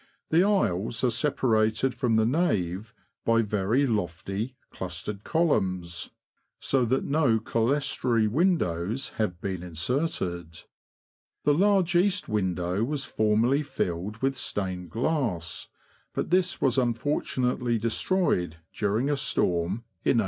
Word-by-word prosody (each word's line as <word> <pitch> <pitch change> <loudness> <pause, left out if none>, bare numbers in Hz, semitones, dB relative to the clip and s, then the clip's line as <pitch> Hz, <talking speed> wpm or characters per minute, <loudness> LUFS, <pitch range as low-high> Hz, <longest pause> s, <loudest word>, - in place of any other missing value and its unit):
The 165 +3 +5
aisles 115 - +1
are 125 - +3
separated 115 -2 +1
from 120 -2 +1
the 110 0 +4
nave 110 - 0 0.3
by 115 0 +3
very 105 +6 +1
lofty, 105 - -2 0.2
clustered 95 +3 -5
columns, 95 - 0 0.5
so 130 -2 +1
that 130 +3 +1
no 140 -6 +2
clerestory 115 -1 +1
windows 120 - +1
have 90 -6 -1
been 95 -2 -3
inserted. 85 - -3 0.8
The 145 - +4
large 190 +1 +3
east 190 +2 +2
window 95 -1 0
was 140 +2 -2
formerly 115 +6 +2
filled 105 - -3
with 135 0 +2
stained 90 -3 -3
glass, 115 - -1 0.5
but - - -2
this 185 +1 +2
was 135 -1 +2
unfortunately 125 -1 0
destroyed, 115 - 0 0.2
during 110 +5 0
a 145 - +2
storm, 95 - 0 0.2
in - - +3
1809. - - +5
115 Hz, 120 wpm, -27 LUFS, 95-140 Hz, 0.8 s, The